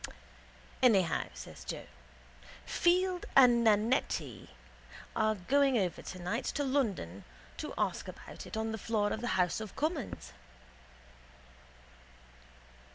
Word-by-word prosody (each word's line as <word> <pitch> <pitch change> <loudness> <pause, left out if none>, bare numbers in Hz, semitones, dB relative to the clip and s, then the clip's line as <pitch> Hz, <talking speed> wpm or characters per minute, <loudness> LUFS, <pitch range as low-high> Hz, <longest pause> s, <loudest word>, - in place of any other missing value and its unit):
—Anyhow, 195 -10 +4
says - - -9
Joe, - - -5 0.8
Field 360 +1 +2
and 245 -3 +7
Nannetti 210 - +1 0.7
are 215 0 +2
going 270 +7 +3
over 180 -6 -1
tonight 185 +7 -4
to 290 - -1
London 215 - -1 0.3
to - - -5
ask - - -1
about - - -9
it - - -6
on 220 0 -1
the 220 - -4
floor 210 -1 0
of 220 - -4
the 245 - -2
house 180 +3 +1
of 215 -3 -7
commons. 310 - -3
220 Hz, 110 wpm, -32 LUFS, 190-270 Hz, 0.8 s, and